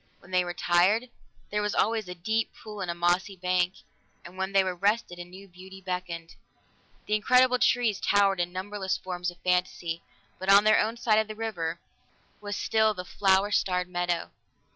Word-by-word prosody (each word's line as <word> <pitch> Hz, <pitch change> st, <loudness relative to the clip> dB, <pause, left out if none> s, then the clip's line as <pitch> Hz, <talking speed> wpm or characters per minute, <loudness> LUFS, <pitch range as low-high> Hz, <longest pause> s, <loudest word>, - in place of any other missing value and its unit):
When 175 Hz, -, -18 dB
they 180 Hz, 0 st, +3 dB
were 175 Hz, 0 st, -5 dB
tired, 200 Hz, +8 st, +2 dB, 0.4 s
there 210 Hz, 0 st, 0 dB
was 210 Hz, 0 st, -1 dB
always 220 Hz, -3 st, +1 dB
a 180 Hz, -, -6 dB
deep 220 Hz, +6 st, -1 dB
pool 210 Hz, -2 st, -9 dB
and 180 Hz, -, -3 dB
a 170 Hz, -, -2 dB
mossy 175 Hz, +3 st, +1 dB
bank; 180 Hz, 0 st, 0 dB, 0.5 s
and 175 Hz, +1 st, -11 dB
when 190 Hz, +1 st, -3 dB
they 195 Hz, -1 st, +4 dB
were 185 Hz, -1 st, -2 dB
rested, 200 Hz, -1 st, 0 dB
a -, -, -5 dB
new 185 Hz, +3 st, -13 dB
beauty 190 Hz, +1 st, -13 dB
beckoned. 180 Hz, -3 st, -5 dB, 0.7 s
The 210 Hz, -, -2 dB
incredible 250 Hz, +4 st, +4 dB
trees 230 Hz, -6 st, +2 dB
towered 200 Hz, -2 st, +3 dB
in 175 Hz, 0 st, -1 dB
numberless 190 Hz, +1 st, -3 dB
forms 180 Hz, -1 st, -4 dB
of 175 Hz, -, -12 dB
fantasy, 180 Hz, -2 st, -1 dB, 0.4 s
but 190 Hz, -, -4 dB
on 200 Hz, +1 st, +8 dB
their 215 Hz, 0 st, +5 dB
own 225 Hz, +2 st, 0 dB
side 220 Hz, -2 st, +3 dB
of 220 Hz, -, 0 dB
the 215 Hz, -, -7 dB
river 175 Hz, -7 st, -3 dB, 0.6 s
was 205 Hz, 0 st, -4 dB
still 220 Hz, -1 st, +2 dB
the 180 Hz, -1 st, -6 dB
flower 195 Hz, +2 st, +2 dB
starred 180 Hz, -3 st, 0 dB
meadow. 175 Hz, -1 st, -2 dB
190 Hz, 185 wpm, -27 LUFS, 180-210 Hz, 0.7 s, on